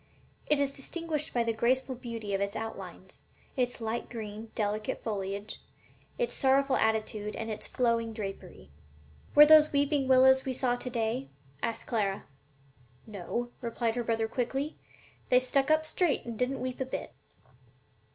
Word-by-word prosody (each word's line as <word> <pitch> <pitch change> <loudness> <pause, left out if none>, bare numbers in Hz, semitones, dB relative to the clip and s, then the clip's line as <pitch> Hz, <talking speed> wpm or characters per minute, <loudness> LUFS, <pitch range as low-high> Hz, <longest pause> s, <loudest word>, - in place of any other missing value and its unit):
It 300 -1 +3
is 280 -1 +1
distinguished 305 +2 -4
by 240 - +1
the 230 0 0
graceful 255 +4 +1
beauty 230 -4 -5
of 195 - 0
its 200 0 -1
outlines, 225 0 -7 0.3
its 245 -2 -1
light 225 +1 -3
green, 220 -1 -7
delicate 210 0 -2
foliage, 200 -1 -4 0.6
its 485 -1 0
sorrowing 270 0 +3
attitude 215 -1 0
and 225 0 -4
its 215 - -5
flowing 230 -2 +1
drapery.'" 195 - -7 0.6
"Were 295 +1 +11
those 305 0 +7
weeping 285 -1 +2
willows 260 0 +7
that - - -15
we 260 - 0
saw 250 -1 +1
to 250 +1 -5
day?" 220 - -1 0.3
asked 230 - -2
Clara. 200 -5 -1 0.8
"No," 225 +4 -4
replied 235 -1 -1
her 240 - -1
brother, 225 -1 0
quickly; 270 +6 -2 0.5
"they 250 - +6
just 255 0 +1
stuck 275 +1 +2
up 310 0 +4
straight 320 -1 0
and 235 -1 -5
didn't 250 +4 -1
weep 255 0 -3
a - - +1
bit." 260 - -5
240 Hz, 160 wpm, -30 LUFS, 220-265 Hz, 0.8 s, Were